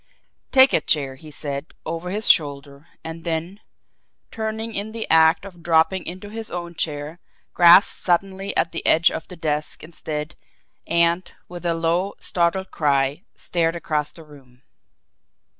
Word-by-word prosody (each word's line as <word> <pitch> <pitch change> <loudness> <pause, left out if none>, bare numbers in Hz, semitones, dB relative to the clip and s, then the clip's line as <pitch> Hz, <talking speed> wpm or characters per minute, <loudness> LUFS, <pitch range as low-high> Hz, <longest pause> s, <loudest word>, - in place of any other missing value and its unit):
"Take 265 +1 +6
a - - +4
chair," 140 -4 +1
he 150 +4 -13
said, 145 +1 -6
over 165 +2 -4
his 210 +3 -2
shoulder 140 -1 +1 0.2
and 165 0 -8
then, 170 +4 -3 0.7
turning 220 +1 -4
in 215 +1 -4
the 225 -1 -4
act 160 +2 +5
of 180 -3 -12
dropping 165 +3 +2
into 185 +4 -7
his 225 0 -6
own 175 -1 -6
chair, 150 0 -3 0.3
grasped 175 +3 +6
suddenly 195 +2 0
at 170 - +2
the 165 - -3
edge 165 +2 +5
of 160 - -6
the 180 - -10
desk 150 -2 -3
instead, 155 -1 -6 0.5
and, 170 +2 +1 0.2
with 175 0 -6
a 170 - +1
low, 170 +4 0
startled 185 +2 0
cry, 140 0 +1
stared 165 -1 -1
across 150 -3 -2
the 165 - -14
room. 135 -5 -18
170 Hz, 150 wpm, -22 LUFS, 155-185 Hz, 0.7 s, Take